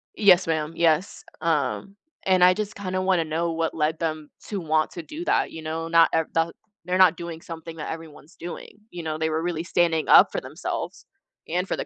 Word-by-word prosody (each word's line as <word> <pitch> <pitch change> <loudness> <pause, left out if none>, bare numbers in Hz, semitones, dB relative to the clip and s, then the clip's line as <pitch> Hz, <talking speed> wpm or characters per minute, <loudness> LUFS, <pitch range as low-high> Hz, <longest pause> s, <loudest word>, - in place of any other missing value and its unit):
Yes, 190 -3 +5
ma'am, 160 -1 -1
yes, 165 +2 +1 0.2
um, 165 +4 -1 0.3
and 185 -1 +3
I 180 0 +7
just 210 +1 -4
kinda 185 -2 -3
wanna 185 -3 +2
know 165 +2 -1
what 165 0 -1
led 155 0 0
them 155 -2 -3 0.2
to 205 -2 -3
want 155 -2 +1
to 170 - -7
do 315 - -7
that, - - +1
you 160 - -8
know, 160 +1 -4
not 165 0 +5
eh 160 - +3
that 165 0 +1 0.3
they're 180 +1 -1
not 185 -3 +6
doing 170 -1 -7
something 165 0 -9
that 150 - -5
everyone's 160 0 -10
doing, 175 +4 -9
you 175 -1 -7
know, 155 -1 -3
they 160 0 0
were 160 +1 -1
really 170 -2 -2
standing 170 -2 +1
up - - +8
for - - -3
themselves - - -5 0.4
and 180 +3 -1
for - - -2
the - - -3
165 Hz, 215 wpm, -24 LUFS, 160-180 Hz, 0.4 s, up